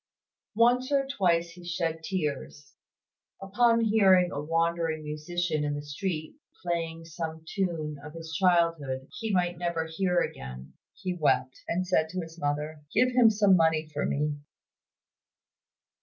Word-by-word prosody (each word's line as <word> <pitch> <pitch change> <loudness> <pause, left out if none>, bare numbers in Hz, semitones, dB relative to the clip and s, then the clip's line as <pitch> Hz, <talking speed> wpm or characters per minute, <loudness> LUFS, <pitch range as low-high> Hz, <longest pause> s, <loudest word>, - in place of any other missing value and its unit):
Once 245 +4 +3
or 275 -1 +3
twice 175 -10 +1
he 180 0 -13
shed 170 -2 -2
tears. 150 -5 -4 0.7
Upon 230 +4 +3
hearing 195 -5 +4
a 145 - -3
wandering 165 0 0
musician 155 +1 -2
in 145 0 -1
the 145 - -5
street 155 - -4 0.3
playing 165 -1 -3
some 160 -1 -6
tune 165 -7 -2
of 150 +1 -9
his 165 -1 -8
childhood 165 -7 +1
he 225 -2 -2
might 175 -2 0
never 170 -2 -1
hear 180 +2 0
again, 65 +1 -5 0.2
he 185 - -3
wept, 130 -6 +1
and 185 +2 -1
said 160 -3 +1
to 185 +2 -3
his 165 0 -10
mother, 150 +1 -2
"Give 250 +4 +3
him 245 -2 +6
some 205 -3 +4
money 160 -2 +2
for 145 - -1
me!" 150 +1 -1
165 Hz, 140 wpm, -28 LUFS, 155-185 Hz, 0.7 s, him